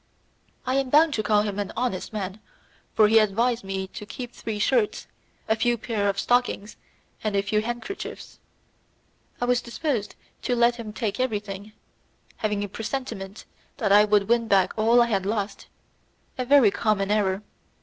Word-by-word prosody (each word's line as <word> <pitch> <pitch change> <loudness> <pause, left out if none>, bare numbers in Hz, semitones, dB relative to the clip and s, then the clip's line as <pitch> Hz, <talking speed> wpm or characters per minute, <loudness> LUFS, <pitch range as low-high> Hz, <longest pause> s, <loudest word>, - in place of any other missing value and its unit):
I 260 +1 +1
am 270 -1 0
bound 305 +2 +5
to 220 - 0
call 210 -1 +3
him 205 -1 -3
an 205 - -3
honest 235 -6 -2
man, 200 -1 -4 0.6
for 215 - +6
he 225 +1 +6
advised 230 +3 +1
me 195 0 -3
to - - -8
keep 240 +4 -7
three 220 -2 -5
shirts, 215 0 +1 0.4
a 220 - +3
few 240 +2 +1
pairs 210 -3 -1
of 200 0 -1
stockings, 245 -3 0 0.5
and 215 -2 -1
a 200 - +2
few 210 +1 +1
handkerchiefs; 240 - -6 1.0
I 245 - 0
was 245 0 +2
disposed 235 -4 -3 0.3
to 245 - 0
let 240 0 +3
him 225 -3 -6
take 220 0 -3
everything, 210 -4 -3 0.6
having 210 -1 -1
a - - -3
presentiment 215 -2 -5 0.3
that 215 -7 0
I 205 +1 +8
would 205 -2 +2
win 235 -1 +2
back 195 -3 +3
all 230 +2 +5
I - - -1
had 200 -5 0
lost; 205 -1 -3 0.7
a 255 - -3
very 265 -5 +6
common 205 -2 0
error. 200 -1 +1
215 Hz, 170 wpm, -25 LUFS, 205-240 Hz, 1.0 s, I